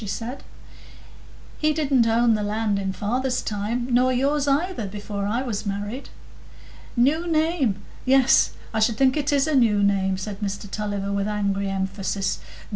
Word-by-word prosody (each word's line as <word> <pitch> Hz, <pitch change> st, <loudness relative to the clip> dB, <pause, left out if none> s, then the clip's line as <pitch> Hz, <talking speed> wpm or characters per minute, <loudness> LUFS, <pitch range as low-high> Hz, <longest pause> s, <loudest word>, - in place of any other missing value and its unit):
she -, -, -5 dB
said; 235 Hz, +6 st, -5 dB, 1.2 s
"he 305 Hz, 0 st, +3 dB
didn't 270 Hz, -6 st, +2 dB
own 230 Hz, +1 st, +4 dB
the 215 Hz, -, 0 dB
land 210 Hz, 0 st, 0 dB
in 195 Hz, -1 st, -2 dB
father's 245 Hz, +7 st, -1 dB
time, 215 Hz, +4 st, -2 dB
nor 250 Hz, +1 st, +4 dB
yours 280 Hz, +3 st, +1 dB
either, 285 Hz, -, 0 dB
before 205 Hz, 0 st, -4 dB
I 235 Hz, +5 st, 0 dB
was 215 Hz, -5 st, -3 dB
married." 205 Hz, +5 st, -4 dB, 0.9 s
"New 300 Hz, +8 st, +2 dB
name? 315 Hz, -, +1 dB, 0.3 s
Yes, 265 Hz, 0 st, +4 dB, 0.2 s
I 220 Hz, -, 0 dB
should 220 Hz, 0 st, +2 dB
think 260 Hz, 0 st, +3 dB
it 290 Hz, -1 st, 0 dB
is 280 Hz, -1 st, +3 dB
a 310 Hz, -, -1 dB
new 220 Hz, -6 st, +4 dB
name," 190 Hz, -1 st, +2 dB
said 195 Hz, +1 st, -6 dB
Mr 200 Hz, 0 st, -3 dB
Tulliver, 200 Hz, -1 st, -3 dB
with 200 Hz, 0 st, -1 dB
angry 200 Hz, -1 st, -1 dB
emphasis. 195 Hz, 0 st, -2 dB
220 Hz, 160 wpm, -24 LUFS, 200-265 Hz, 1.2 s, own